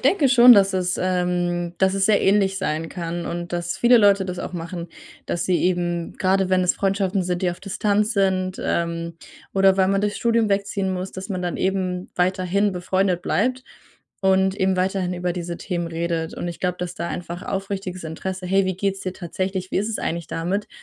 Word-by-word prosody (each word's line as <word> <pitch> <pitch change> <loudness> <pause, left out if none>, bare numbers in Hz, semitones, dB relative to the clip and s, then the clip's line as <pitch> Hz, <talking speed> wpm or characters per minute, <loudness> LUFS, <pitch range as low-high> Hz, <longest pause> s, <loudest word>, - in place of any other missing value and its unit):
denke 305 -9 +3
schon, 245 -1 +9
dass 195 -3 +5
es, 180 -1 0
ähm 175 -1 -1
dass 190 0 +3
es 195 -1 +2
sehr 210 -2 +4
ähnlich 195 -1 +3
sein 165 -3 -2
kann 170 -1 -4
und 175 0 -5
dass 175 0 -2
viele 240 0 +5
Leute 200 -2 +4
das 180 -1 -5
auch - - -5
machen, 170 0 -5 0.4
dass 170 - -2
sie 180 -2 +2
eben 175 -2 0
grade 190 0 +2
wenn 185 -1 +3
es 180 - +2
Freundschaften 195 -1 0
sind, 180 0 -2
die 180 - +2
auf 175 - -7
Distanz 210 +2 0
sind, 190 -2 0
ähm, 170 0 -2 0.4
oder 195 -1 +4
weil 190 -1 +3
man 195 0 +2
durchs 210 0 -1
Studium 230 -2 +2
wegziehen 200 -1 0
muss, 185 +1 -4
dass 190 +2 -7
man 185 -2 -3
dann 175 - -2
eben 185 -1 -1
weiterhin 185 +2 +1
befreundet 185 0 0
bleibt 255 +4 0 0.6
und 190 0 +3
eben 190 -2 +1
weiterhin 185 -1 0
über 180 0 -2
diese 175 -1 -5
Themen 175 -3 -3
redet. 165 0 -2
Und - - -5
ich 170 -1 -6
glaube, 180 -1 -1
dass 180 0 -4
da 170 0 -4
einfach 175 +2 -5
aufrichtiges 195 -2 -4
Interesse: 185 +3 -5
„Hey, 195 +2 +3
wie 185 - -2
geht's 195 0 -1
dir 185 - -4
tatsächlich? 185 +1 -4
Wie - - +2
ist 210 - -1
es 220 - -2
eigentlich 170 0 -3
damit?“ 185 +5 -2
185 Hz, 200 wpm, -22 LUFS, 175-195 Hz, 0.6 s, schon